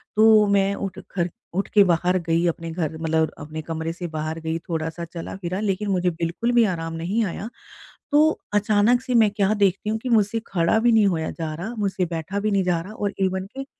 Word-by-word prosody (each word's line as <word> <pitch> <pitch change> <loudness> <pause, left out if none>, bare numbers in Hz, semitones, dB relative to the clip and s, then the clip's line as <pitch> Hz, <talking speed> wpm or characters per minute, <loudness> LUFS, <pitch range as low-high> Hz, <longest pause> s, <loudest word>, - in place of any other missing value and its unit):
तो 215 -1 +6
मैं 200 0 +2
उठ 195 -2 -5
खर 175 -2 -1 0.3
उठ 195 - 0
के 205 - +7
बाहर 180 0 +2
गई 165 +1 +2
अपने 165 0 -3
घर 160 -2 -3
मतलब 160 -1 +1
अपने 155 +2 -6
कमरे 160 +1 -4
से 175 0 -5
बाहर 155 +1 -3
गई 160 0 -2
थोड़ा-सा 160 0 -3
चला-फिरा 180 +2 -5
लेकिन 205 0 -1
मुझे 180 -2 +2
बिल्कुल 170 +7 -2
भी 240 -1 +5
आराम 165 -4 -3
नहीं 185 +8 -1
आया। 200 +4 -5 0.6
तो 295 - +6 0.3
अचानक 210 +3 +3
से 250 - -3
मैं 215 -2 +4
क्या 200 -1 +1
देखती 200 +2 +2
हूँ 220 - -1
कि 255 - -5
मुझसे 225 -1 +2
खड़ा 170 +4 +2
भी 235 +1 +3
नहीं 215 -2 +5
होया 160 -4 0
जा 160 -2 -5
रहा, 195 +9 -5
मुझसे 195 -3 0
बैठा 170 +4 -4
भी 215 +1 0
नहीं 195 -2 +2
जा 175 -2 +1
रहा 195 +5 -9
और 205 -2 -2
इवन 190 0 0
कि 270 - -4
190 Hz, 215 wpm, -23 LUFS, 165-210 Hz, 0.6 s, के